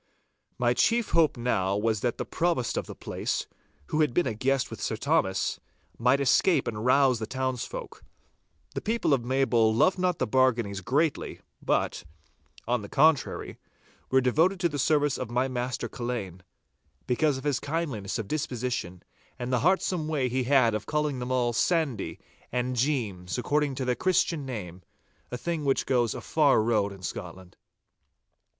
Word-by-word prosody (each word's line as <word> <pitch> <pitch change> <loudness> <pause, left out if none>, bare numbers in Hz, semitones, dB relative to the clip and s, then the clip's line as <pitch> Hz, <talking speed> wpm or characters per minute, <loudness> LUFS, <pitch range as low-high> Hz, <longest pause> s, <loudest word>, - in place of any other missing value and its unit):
My - - +2
chief 235 -1 +2
hope 160 -5 +3
now 100 -5 0
was 110 0 0
that 120 +2 -1
the - - -3
Provost 165 -8 0
of - - -2
the - - -8
place, - - -3 0.4
who 155 - +1
had 150 -6 +1
been 175 - +3
a - - -1
guest 130 +4 0
with - - -7
Sir - - -1
Thomas, 95 0 0 0.4
might 125 +4 +3
escape 140 +6 +3
and 110 -2 -3
rouse 130 -1 +4
the 110 - -4
townsfolk. 130 -1 -4 0.7
The - - -3
people 225 -8 +1
of 130 -4 +1
Maybole 120 -3 +2
loved 180 +12 +3
not 180 -2 +1
the - - 0
Barganies 115 -5 +1
greatly, 150 - 0 0.2
but, - - 0 0.6
on 120 -1 +1
the 100 - -9
contrary, 150 0 +2 0.5
were 130 0 +4
devoted 160 +9 +2
to 170 - +2
the 145 -2 -4
service 145 0 +2
of - - -4
my 125 +2 +1
master 125 -1 -3
Culzean, 115 -7 -5 0.6
because 135 +3 +1
of 130 - -8
his 145 -3 0
kindliness 145 -11 -3
of 110 - -4
disposition, 125 - -3 0.3
and 125 +1 -3
the 125 - +3
heartsome 180 -1 +1
way 140 -5 0
he 130 +1 -1
had 125 -4 +4
of 105 -1 -3
calling 150 -3 -1
them 125 +1 -4
all 120 -2 +1
'Sandy' 145 - 0 0.3
and 125 +1 -1
'Jeems,' 115 -9 -1
according 145 +2 0
to 130 - -3
their 125 - +2
Christian 165 0 0
name, 95 -8 -6 0.5
a 125 - -4
thing 165 +2 -3
which 135 -1 +1
goes 120 -4 +1
a - - -6
far 145 -8 +3
road 105 -3 +1
in 95 -1 -12
Scotland. 90 +1 -7
130 Hz, 170 wpm, -27 LUFS, 115-150 Hz, 0.7 s, rouse